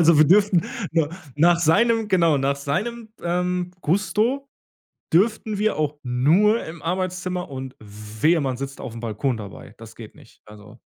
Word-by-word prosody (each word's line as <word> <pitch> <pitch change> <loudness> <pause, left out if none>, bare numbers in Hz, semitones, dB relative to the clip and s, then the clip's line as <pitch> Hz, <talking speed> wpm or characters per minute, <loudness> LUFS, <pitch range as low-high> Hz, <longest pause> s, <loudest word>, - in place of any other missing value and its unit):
Also, 165 -1 +5
wir 155 - +6
dürften 195 -2 +4 0.3
nur 160 -3 +2 0.3
nach 170 +3 +4
seinem 225 +7 +3
genau, 170 -6 +3
nach 135 +1 +1
seinem, 215 +12 -3
ähm, 180 +1 -1
Gusto 220 - 0 0.6
dürften 215 +3 +2
wir 215 +1 +1
auch 150 -1 -1
nur 160 - +3
im 160 -1 -9
Arbeitszimmer 185 +1 -3
und 130 -1 -7
wehe, 110 +10 -1
man 130 -3 -2
sitzt 135 0 -6
aufm 115 -1 -7
Balkon 115 +2 -2
dabei. 100 -3 -10
Das - - -12
geht - - -11
nicht. - - -20
Also 105 +1 -15
170 Hz, 155 wpm, -23 LUFS, 135-190 Hz, 0.6 s, wir